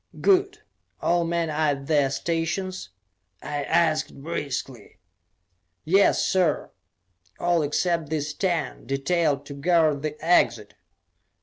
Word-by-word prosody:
"Good. 395 +2 +2 0.4
All 175 0 +1
men 165 -1 -1
are 150 -1 +1
at 135 - -11
their 145 -2 +2
stations?" 165 - -3 0.5
I 145 -1 -3
asked 160 -2 +1
briskly. 135 -7 -5 0.9
"Yes, 195 +4 +3
sir! 180 -5 +1 0.7
All 175 -1 +1
except 160 +1 0
these 150 -1 -2
ten, 170 - -2
detailed 145 +1 0
to 140 - -8
guard 155 -1 +2
the 150 0 -4
exit." 120 -10 +2
160 Hz, 110 wpm, -25 LUFS, 145-175 Hz, 0.9 s, Yes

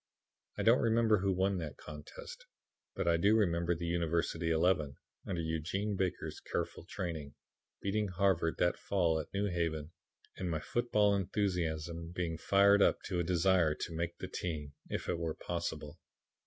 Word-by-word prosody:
I - - -1
don't 115 +2 +6
remember 115 -2 +4
who 100 +1 +1
won 95 +1 +1
that 75 -4 -6
contest, 75 -1 -10 0.5
but - - -2
I 85 -1 +4
do 100 +6 +4
remember 85 -5 +2
the 85 +1 -4
University 85 0 0
eleven, 80 -3 +2 0.3
under 90 -3 -1
Eugene 85 +6 -1
Baker's 95 -2 -2
careful - - -4
training, 80 -5 -5 0.5
beating 105 +1 0
Harvard 90 -3 +1
that 90 - +1
fall 85 -5 +1
at 75 - -6
New 100 +1 0
Haven 85 -4 -1 0.5
and 90 - -2
my 80 -2 -1
football 105 +1 +2
enthusiasm 85 -4 -1
being 85 -3 -2
fired 100 +2 +5
up - - +3
to 90 -4 -2
a - - +2
desire 85 -2 +3
to 85 - -5
make 85 +1 -2
the - - -5
team, 75 -5 -4 0.2
if - - -3
it 85 - -1
were 80 -2 -2
possible. 85 -2 -4
85 Hz, 160 wpm, -33 LUFS, 80-100 Hz, 0.5 s, don't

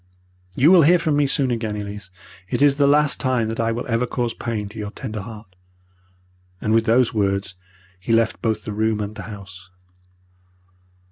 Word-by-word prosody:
You 150 +7 +5
will 185 -3 +8
hear 170 +4 +5
from 160 -3 0
me 145 -1 +2
soon 135 -1 0
again, 110 -3 -2
Elise. 105 -1 -7 0.4
It - - +1
is 145 -1 +4
the 140 -1 +4
last 150 0 +3
time 125 -4 0
that 115 - -5
I 115 0 +1
will 115 +1 -3
ever 120 +1 0
cause 120 -1 -2
pain 110 -4 -4
to 110 +1 -10
your 105 -1 -4
tender 105 0 -6
heart,' 105 -2 -11 1.0
and 110 - -1
with 115 0 +3
these 120 +2 +3
words 100 -2 -1 0.5
he 95 - -4
left 115 -1 +2
both 110 -2 -1
the 105 - -4
room 110 0 0
and 105 0 -4
the 110 - -8
house. 95 -3 -11
115 Hz, 190 wpm, -21 LUFS, 105-130 Hz, 1.0 s, will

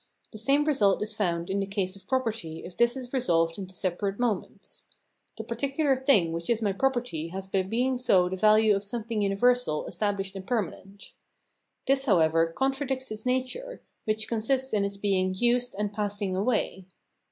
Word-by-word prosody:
The 215 - -9
same 275 +6 +3
result 215 -10 +3
is 210 - -6
found 170 -4 -1
in 200 - 0
the 195 - -2
case 195 -1 -2
of 195 - -16
property 225 -11 -2
if 175 - -10
this 235 +2 +2
is 250 -1 -7
resolved 165 -9 +1
into 190 -1 -8
separate 195 +3 -2
moments. 235 -6 -3 0.5
The 220 - -5
particular 275 +5 0
thing 255 - +3
which 170 +1 -4
is 235 -2 +2
my 205 -3 0
property 240 -8 -1
has 190 +3 -6
by 190 0 0
being 245 +6 0
so 190 -8 +4
the 185 - -3
value 215 +1 +5
of 195 - -1
some 220 +3 -4
thing 225 -1 -2
universal, 205 -3 +2
estabhshed, 200 -2 -2
and 190 -1 -8
permanent. 200 -3 -4 0.7
This, 270 0 +2
how 200 -7 +4
ever, 165 0 +3
contradicts 265 - -2
its 215 +3 -5
nature, 260 - -2 0.2
which 220 0 -1
consists 255 +3 0
in 205 -2 +2
its 200 0 -3
being 185 -2 0
used 245 +3 +1
and 210 0 -2
passing 205 -2 -2
away. 200 -2 -1
210 Hz, 180 wpm, -27 LUFS, 190-250 Hz, 0.7 s, value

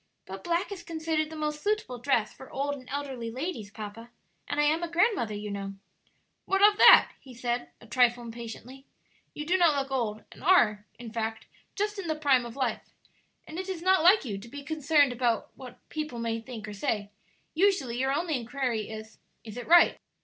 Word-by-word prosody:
"But 190 0 -8
black 345 +4 -1
is 390 -3 -6
considered 320 -2 -2
the 320 - -8
most 300 -1 -3
suitable 410 - -1
dress 240 -4 +1
for 265 - -13
old 280 +1 -2
and 255 -3 -10
elderly 270 -4 -4
ladies, 255 - -5
papa; 215 +2 -9 0.4
and - - -2
I - - +4
am 310 +3 +2
a 345 - -3
grandmother, 345 - +1
you 210 0 -5
know." 195 -1 -5 0.7
"What 390 +1 +2
of 420 0 0
that?" - - +9
he 260 -3 -14
said, 240 0 -2
a - - -15
trifle 240 0 +2
impatiently; 235 +3 -9 0.5
"you 300 - -5
do 355 +4 +2
not 335 -4 +5
look 275 -1 -2
old, 220 -5 -2
and - - -14
are, 210 - +4
in 230 -2 -9
fact, 225 -1 -3 0.3
just 415 0 -2
in 370 - -5
the 315 - 0
prime 275 -5 +2
of 235 - -10
life. 265 -2 -1 0.6
And 320 +3 -7
it 380 +1 -5
is 350 -3 -4
not 375 -2 +4
like 365 +1 +6
you 200 -5 -4
to 205 - -12
be 285 +4 -9
concerned 295 -2 +2
about 240 -2 0
what 250 -2 -11
people 305 -5 -4
may 230 -1 -2
think 225 -2 -8
or 210 - -6
say. 205 0 -2 0.4
Usually 320 -10 +1
your 265 +1 +1
only 315 +2 0
inquiry 240 -3 -2
is, 220 0 -9 0.2
'Is 220 -1 -9
it 245 - -7
right?' 345 +1 +6
265 Hz, 200 wpm, -28 LUFS, 230-315 Hz, 0.7 s, that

